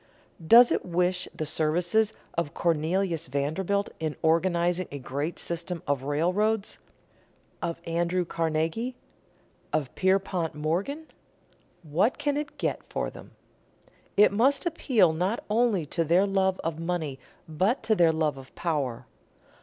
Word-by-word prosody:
Does 240 Hz, +4 st, +8 dB
it -, -, +1 dB
wish 180 Hz, +1 st, 0 dB
the 155 Hz, -, -4 dB
services 170 Hz, +8 st, +1 dB, 0.2 s
of 165 Hz, -4 st, -2 dB
Cornelius 170 Hz, +1 st, 0 dB
Vanderbilt 165 Hz, +9 st, -1 dB
in 155 Hz, -2 st, -2 dB
organizing 175 Hz, +2 st, +2 dB
a 140 Hz, -, -5 dB
great 140 Hz, +5 st, -4 dB
system 170 Hz, 0 st, -4 dB
of 140 Hz, -2 st, 0 dB
railroads, 185 Hz, +9 st, 0 dB, 0.8 s
of 170 Hz, -1 st, -3 dB
Andrew 175 Hz, +2 st, 0 dB
Carnegie, 165 Hz, +10 st, -1 dB, 0.8 s
of 145 Hz, -5 st, -1 dB
Pierpont 190 Hz, -4 st, 0 dB
Morgan? 180 Hz, -, -2 dB, 0.8 s
What 170 Hz, -, +1 dB
can 290 Hz, -1 st, 0 dB
it 290 Hz, 0 st, -4 dB
get -, -, -1 dB
them -, -, -27 dB
for? -, -, -2 dB, 1.1 s
It 210 Hz, -, +7 dB
must 265 Hz, -, +2 dB
appeal 245 Hz, -, +3 dB
not 185 Hz, +8 st, -1 dB
only 220 Hz, -7 st, +2 dB
to 165 Hz, +3 st, -1 dB
their 175 Hz, +5 st, +4 dB
love 190 Hz, -1 st, +1 dB
of 165 Hz, -1 st, -3 dB
money 165 Hz, -5 st, -3 dB, 0.3 s
but 185 Hz, -, 0 dB
to 220 Hz, 0 st, +2 dB
their 170 Hz, -5 st, +5 dB
love 155 Hz, -3 st, 0 dB
of 135 Hz, 0 st, -13 dB
power. 145 Hz, -8 st, -2 dB
170 Hz, 130 wpm, -27 LUFS, 155-200 Hz, 1.1 s, Does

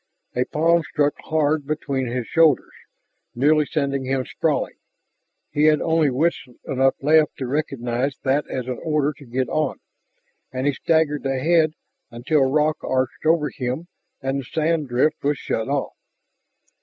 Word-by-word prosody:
A 125 Hz, 0 st, +1 dB
palm 170 Hz, +2 st, +2 dB
struck 145 Hz, -2 st, 0 dB
hard 155 Hz, -2 st, +1 dB
between 140 Hz, -4 st, -2 dB
his 120 Hz, 0 st, -3 dB
shoulders, 160 Hz, -2 st, +3 dB, 0.6 s
nearly 150 Hz, +4 st, +3 dB
sending 140 Hz, -3 st, -1 dB
him 130 Hz, 0 st, -1 dB
sprawling. -, -, -1 dB, 0.7 s
He 150 Hz, +1 st, +2 dB
had 155 Hz, -1 st, +5 dB
only 160 Hz, -2 st, +2 dB
wits 155 Hz, +7 st, 0 dB, 0.2 s
enough 135 Hz, 0 st, +2 dB
left 155 Hz, +1 st, +4 dB
to 130 Hz, -, -3 dB
recognize 135 Hz, -1 st, -2 dB
that 140 Hz, +2 st, +1 dB
as 130 Hz, -, -3 dB
an 125 Hz, -1 st, -4 dB
order 150 Hz, -2 st, 0 dB
to 140 Hz, -, -12 dB
get 125 Hz, +1 st, -2 dB
on, 155 Hz, +4 st, -1 dB, 0.7 s
and 130 Hz, +1 st, -3 dB
he 145 Hz, -, +2 dB
staggered 160 Hz, -1 st, +1 dB
ahead 155 Hz, +4 st, +2 dB, 0.4 s
until 135 Hz, +5 st, +1 dB
rock 155 Hz, +2 st, +2 dB
arched 130 Hz, +3 st, -1 dB
over 155 Hz, -3 st, +3 dB
him 130 Hz, +7 st, -4 dB, 0.3 s
and 135 Hz, +1 st, -1 dB
the -, -, -5 dB
sand 155 Hz, +2 st, 0 dB
drift 125 Hz, +6 st, +1 dB
was 145 Hz, 0 st, +1 dB
shut 115 Hz, +3 st, -3 dB
off. 140 Hz, -1 st, -1 dB
145 Hz, 150 wpm, -22 LUFS, 130-155 Hz, 0.7 s, had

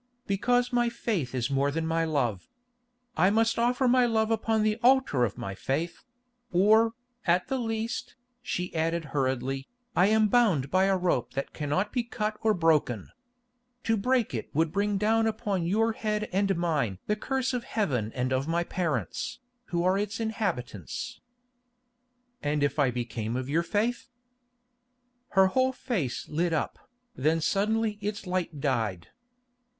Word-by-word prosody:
"Because 245 Hz, +5 st, +1 dB
my 240 Hz, -1 st, +3 dB
faith 175 Hz, -, -2 dB
is 125 Hz, +2 st, -1 dB
more 140 Hz, +1 st, +2 dB
than 160 Hz, +3 st, -2 dB
my 165 Hz, 0 st, +1 dB
love. 125 Hz, -, -1 dB, 0.7 s
I 185 Hz, -, +4 dB
must 225 Hz, +2 st, +2 dB
offer 250 Hz, +2 st, +2 dB
my 250 Hz, 0 st, +5 dB
love 220 Hz, -1 st, +1 dB
upon 220 Hz, -1 st, +1 dB
the 215 Hz, +1 st, +1 dB
altar 255 Hz, -, +4 dB
of 105 Hz, -, -5 dB
my 95 Hz, -, -4 dB
faith—or, 225 Hz, -, 0 dB, 0.3 s
at 175 Hz, +5 st, +3 dB
the 265 Hz, -1 st, 0 dB
least," 225 Hz, 0 st, -3 dB, 0.3 s
she 180 Hz, -7 st, -3 dB
added 165 Hz, 0 st, 0 dB
hurriedly, 135 Hz, -1 st, -1 dB, 0.3 s
"I 180 Hz, -, +5 dB
am 215 Hz, 0 st, +4 dB
bound 195 Hz, -, +3 dB
by 185 Hz, +1 st, +4 dB
a 195 Hz, -1 st, +3 dB
rope 125 Hz, -10 st, 0 dB
that 135 Hz, -, -3 dB
cannot 150 Hz, +7 st, -1 dB
be 245 Hz, -, +2 dB
cut 215 Hz, -2 st, -3 dB
or 220 Hz, -1 st, +3 dB
broken. 150 Hz, -, +1 dB, 0.7 s
To 225 Hz, -, +2 dB
break 245 Hz, -, +1 dB
it 115 Hz, -, -4 dB
would 160 Hz, +1 st, +2 dB
bring 200 Hz, +2 st, 0 dB
down 225 Hz, +2 st, +2 dB
upon 205 Hz, -5 st, -1 dB
your 225 Hz, +5 st, +2 dB
head 215 Hz, -1 st, -2 dB
and 195 Hz, 0 st, +2 dB
mine 150 Hz, -, 0 dB
the 210 Hz, -, +1 dB
curse 260 Hz, +4 st, -1 dB
of 245 Hz, -1 st, -2 dB
Heaven 135 Hz, -, -1 dB
and 130 Hz, 0 st, 0 dB
of 130 Hz, +3 st, 0 dB
my 170 Hz, +1 st, +1 dB
parents, 170 Hz, -3 st, -2 dB, 0.3 s
who 175 Hz, -5 st, -1 dB
are 185 Hz, +2 st, +3 dB
its 210 Hz, +2 st, -3 dB
inhabitants." 220 Hz, -, -3 dB, 1.2 s
"And 145 Hz, 0 st, 0 dB
if 145 Hz, +1 st, 0 dB
I 140 Hz, -3 st, +4 dB
became 120 Hz, -2 st, -3 dB
of 130 Hz, 0 st, -3 dB
your 155 Hz, +4 st, +2 dB
faith?" 220 Hz, +8 st, -1 dB, 1.3 s
Her 190 Hz, -, +8 dB
whole 260 Hz, +7 st, +2 dB
face 190 Hz, -, -3 dB
lit 165 Hz, +2 st, 0 dB
up, 160 Hz, -, -3 dB, 0.3 s
then 155 Hz, +5 st, +2 dB
suddenly 210 Hz, +5 st, 0 dB
its 205 Hz, 0 st, -3 dB
light 180 Hz, -4 st, -2 dB
died. 110 Hz, -, -1 dB
190 Hz, 155 wpm, -28 LUFS, 145-225 Hz, 1.3 s, Her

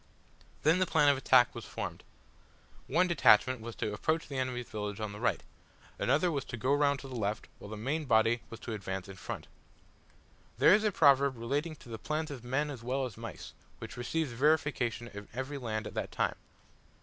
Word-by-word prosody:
Then 160 Hz, +4 st, +4 dB
the 185 Hz, -, +2 dB
plan 150 Hz, -3 st, +4 dB
of 140 Hz, -, +5 dB
attack 125 Hz, -3 st, +5 dB
was -, -, -7 dB
formed. -, -, -6 dB, 0.8 s
One 170 Hz, +7 st, +3 dB
detachment 130 Hz, -7 st, +4 dB
was 115 Hz, 0 st, -7 dB
to 105 Hz, -, -2 dB
approach 160 Hz, +10 st, 0 dB
the 140 Hz, -2 st, -3 dB
enemy's 125 Hz, -2 st, -2 dB
village 105 Hz, -1 st, -4 dB
on 110 Hz, -1 st, -3 dB
the 105 Hz, -, -8 dB
right; -, -, 0 dB, 0.6 s
another 155 Hz, +8 st, +2 dB
was 140 Hz, -4 st, -1 dB
to 120 Hz, -, -6 dB
go 130 Hz, +5 st, +1 dB
round 145 Hz, -1 st, +3 dB
to 135 Hz, -, -9 dB
the 130 Hz, -, -8 dB
left; 105 Hz, -2 st, -2 dB
while 100 Hz, -, -10 dB
the 110 Hz, -, -6 dB
main 145 Hz, +8 st, -2 dB
body 115 Hz, -1 st, +3 dB
was 115 Hz, -, -9 dB
to 115 Hz, -, -5 dB
advance 95 Hz, -3 st, -4 dB
in 95 Hz, -1 st, -10 dB
front. -, -, -6 dB, 1.1 s
There -, -, +7 dB
is 210 Hz, +1 st, +4 dB
a 210 Hz, -, +2 dB
proverb 140 Hz, -5 st, +4 dB
relating 145 Hz, +8 st, -2 dB
to 130 Hz, -, -15 dB
the 110 Hz, -1 st, -6 dB
plans 155 Hz, 0 st, -2 dB
of 130 Hz, -4 st, -7 dB
men 140 Hz, +4 st, -1 dB
as 130 Hz, -5 st, -8 dB
well 130 Hz, +3 st, -1 dB
as 120 Hz, -6 st, -7 dB
mice, -, -, -8 dB, 0.2 s
which -, -, -8 dB
receives 140 Hz, +4 st, -2 dB
verification 130 Hz, -3 st, +1 dB
in 105 Hz, -1 st, -9 dB
every 135 Hz, +2 st, -4 dB
land 110 Hz, -3 st, -3 dB
and -, -, -4 dB
time. -, -, 0 dB
130 Hz, 200 wpm, -31 LUFS, 115-145 Hz, 1.1 s, There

